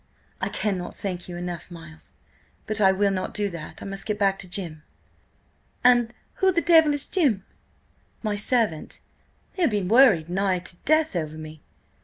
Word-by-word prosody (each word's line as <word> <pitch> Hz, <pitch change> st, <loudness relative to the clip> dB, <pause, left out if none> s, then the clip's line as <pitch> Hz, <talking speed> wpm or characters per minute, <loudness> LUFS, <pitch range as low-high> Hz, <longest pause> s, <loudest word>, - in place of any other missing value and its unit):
"I -, -, 0 dB
cannot 190 Hz, -4 st, -3 dB
thank 185 Hz, -4 st, -5 dB
you 175 Hz, -, -6 dB
enough, 175 Hz, 0 st, -6 dB
Miles, 165 Hz, -2 st, -12 dB, 0.5 s
but 215 Hz, 0 st, -2 dB
I 190 Hz, -1 st, +6 dB
will 200 Hz, +1 st, +2 dB
not 185 Hz, -1 st, -3 dB
do 205 Hz, -1 st, -1 dB
that. 165 Hz, -3 st, -8 dB
I -, -, -7 dB
must 195 Hz, 0 st, -6 dB
get 210 Hz, -1 st, -1 dB
back 195 Hz, -1 st, +2 dB
to 195 Hz, -, -9 dB
Jim." 170 Hz, -4 st, -5 dB, 1.0 s
"And 240 Hz, -2 st, +5 dB, 0.3 s
who 380 Hz, -1 st, +4 dB
the 345 Hz, -, +2 dB
devil 320 Hz, -3 st, +5 dB
is 290 Hz, -, -2 dB
Jim?" 260 Hz, -, +1 dB, 0.8 s
"My 210 Hz, -2 st, 0 dB
servant. 215 Hz, -6 st, -1 dB, 0.5 s
He'll 350 Hz, -6 st, +2 dB
be 205 Hz, -3 st, -1 dB
worried 200 Hz, -5 st, +5 dB
nigh 190 Hz, +1 st, +1 dB
to 180 Hz, 0 st, -8 dB
death 310 Hz, -5 st, +3 dB
over 155 Hz, -2 st, -3 dB
me. 155 Hz, -1 st, -9 dB
195 Hz, 170 wpm, -25 LUFS, 175-235 Hz, 1.0 s, I